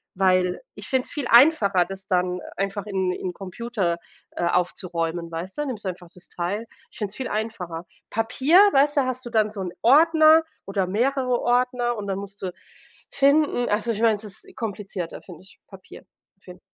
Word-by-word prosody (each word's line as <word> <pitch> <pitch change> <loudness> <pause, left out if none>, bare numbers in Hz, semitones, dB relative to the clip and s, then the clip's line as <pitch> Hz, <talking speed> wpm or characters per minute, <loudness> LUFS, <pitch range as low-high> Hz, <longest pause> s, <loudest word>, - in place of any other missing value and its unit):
weil 185 -1 +2
ich - - -9
finde 260 -1 0
es - - -10
viel 285 -5 -3
einfacher, 230 - +5
das 195 0 -8
dann 180 0 0 0.2
einfach 195 +1 -2
in 190 -2 0
im 180 0 -4
Computer, 195 -2 -3 0.3
äh, 175 - -2
aufzuräumen, 170 -1 -1
weißt 175 - -6
du, 295 - 0
nimmst 220 -6 -6
du - - 0
einfach 175 -1 -9
das 180 - -15
Teil 190 +6 -3 0.3
ich - - -15
finde 205 -2 -3
es - - -10
viel 260 - -3
einfacher. 185 -6 -4 0.2
Papier, 260 +9 +2 0.2
weißt 290 +2 +3
du, - - +6
hast 255 0 -3
du 240 - -5
dann 215 -2 +2
so 205 -2 -6
'n 180 - -4
Ordner 315 +4 +6 0.2
oder 195 -2 -1
mehrere 250 +4 +1
Ordner 245 0 +1
und 200 - -5
dann 195 -1 -2
musst 200 0 -10
du 185 - -3 0.6
finden. 280 -2 +3
Also, 215 +3 0
ich 215 - -3
mein, 225 -2 +4
es 205 - -9
ist 220 - -10
komplizierter, 200 -5 -5
finde 180 -2 -13
ich, 190 - -19
Papier, 190 -2 -14 0.4
find 180 -1 -13
205 Hz, 190 wpm, -24 LUFS, 185-245 Hz, 0.6 s, du